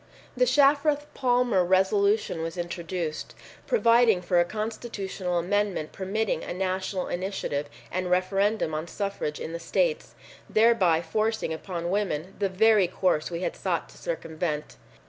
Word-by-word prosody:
The 250 Hz, 0 st, +3 dB
Shafroth 285 Hz, +3 st, +3 dB
Palmer 245 Hz, -6 st, +2 dB
Resolution 195 Hz, 0 st, +2 dB
was 165 Hz, +1 st, -4 dB
introduced, 170 Hz, -2 st, -4 dB, 0.3 s
providing 230 Hz, -, +4 dB
for 175 Hz, 0 st, +2 dB
a 175 Hz, -, +4 dB
constitutional 205 Hz, -3 st, -4 dB
amendment 190 Hz, -2 st, 0 dB
permitting 200 Hz, +3 st, -2 dB
a -, -, -5 dB
national 190 Hz, 0 st, -2 dB
initiative 175 Hz, -6 st, -3 dB, 0.2 s
and 185 Hz, 0 st, -2 dB
referendum 195 Hz, 0 st, +1 dB
on 155 Hz, +2 st, -3 dB
suffrage 195 Hz, -6 st, -3 dB
in 165 Hz, -, -5 dB
the 170 Hz, -, -4 dB
states, 465 Hz, -, -1 dB, 0.3 s
thereby 205 Hz, -8 st, +4 dB
forcing 215 Hz, +1 st, -1 dB
upon 170 Hz, +1 st, -4 dB
women 190 Hz, -3 st, -1 dB
the 200 Hz, -1 st, +1 dB
very 210 Hz, 0 st, +4 dB
course 180 Hz, -3 st, 0 dB
we 170 Hz, 0 st, -4 dB
had -, -, -2 dB
sought -, -, -2 dB
to -, -, -16 dB
circumvent. 160 Hz, -, -3 dB
190 Hz, 135 wpm, -27 LUFS, 175-220 Hz, 0.3 s, providing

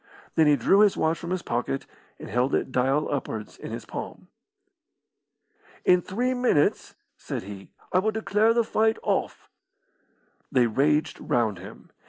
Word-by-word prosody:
Then 160 Hz, -2 st, +4 dB
he 150 Hz, -, +6 dB
drew 165 Hz, -, +3 dB
his 210 Hz, -2 st, +4 dB
watch 160 Hz, 0 st, +1 dB
from 170 Hz, -, -7 dB
his 185 Hz, -1 st, -2 dB
pocket 120 Hz, +3 st, -2 dB, 0.3 s
and -, -, -9 dB
held 125 Hz, +4 st, +1 dB
it -, -, -2 dB
dial 135 Hz, +4 st, +1 dB
upwards 110 Hz, -6 st, -4 dB
in -, -, -9 dB
his -, -, -6 dB
palm. -, -, -8 dB, 1.6 s
"In 180 Hz, 0 st, +5 dB
three 245 Hz, +9 st, -1 dB
minutes," 245 Hz, -12 st, +1 dB, 0.2 s
said -, -, -5 dB
he, 95 Hz, -1 st, -10 dB, 0.2 s
"I 185 Hz, -, +5 dB
will 210 Hz, +3 st, +1 dB
declare 215 Hz, 0 st, +2 dB
the 235 Hz, -, +3 dB
fight 220 Hz, 0 st, +1 dB
off." -, -, -2 dB, 1.0 s
They 125 Hz, -2 st, +4 dB
raged 150 Hz, +6 st, +1 dB
round 110 Hz, -6 st, 0 dB
him. 95 Hz, +3 st, -12 dB
150 Hz, 155 wpm, -26 LUFS, 125-205 Hz, 1.6 s, he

